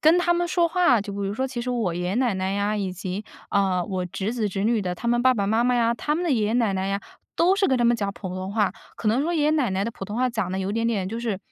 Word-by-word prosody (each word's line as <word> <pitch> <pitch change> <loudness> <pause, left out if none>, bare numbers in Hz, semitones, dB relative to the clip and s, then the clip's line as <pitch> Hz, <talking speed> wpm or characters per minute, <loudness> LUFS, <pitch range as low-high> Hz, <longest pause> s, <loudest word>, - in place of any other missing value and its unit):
跟 325 +3 +5
他 345 -1 +2
们 350 0 0
说 345 -1 +3
话， 335 -10 +3
就 200 0 -6
比 200 - -6
如 200 0 -1
说 260 +5 -1
其 255 -2 -5
实 250 - -2
我 225 -8 -1
爷 175 - -3
爷 180 +3 -1
奶 245 -5 +2
奶 190 0 -1
呀， 205 +1 0
以 195 -3 -2
及， 185 +3 -5 0.3
呃， 190 -3 +2
我 185 -2 -3
侄 195 +5 -3
子 220 -4 0
侄 195 +1 -2
女 225 -1 +2
的 180 -1 -2
他 225 +7 -7
们 240 0 +3
爸 255 0 +6
爸 200 -3 0
妈 220 +3 +2
妈 250 0 +3
呀， 235 -1 +2
他 295 +5 -1
们 350 +2 -1
的 335 - 0
爷 225 -5 +2
爷 220 - 0
奶 230 -4 +2
奶 190 0 -1
呀， 200 0 -1 0.4
都 360 +3 +4
是 395 - +3
跟 265 - +3
他 240 - +2
们 235 0 +4
讲 200 -2 -2
普 190 - -7
通 185 +1 -4
话。 205 -4 +1 0.2
可 220 - -5
能 240 +6 +2
说 335 +3 -1
爷 310 -3 +1
爷 300 - +4
奶 290 -8 +1
奶 190 +1 0
的 230 - -2
普 195 - -7
通 205 +3 -5
话 255 +1 +2
讲 220 -6 -2
得 190 - -1
有 190 +1 -2
点 230 +1 -1
点 200 -5 0
就 225 +2 -4
是， 225 -5 -2
220 Hz, 355 characters per minute, -24 LUFS, 195-250 Hz, 0.4 s, 爸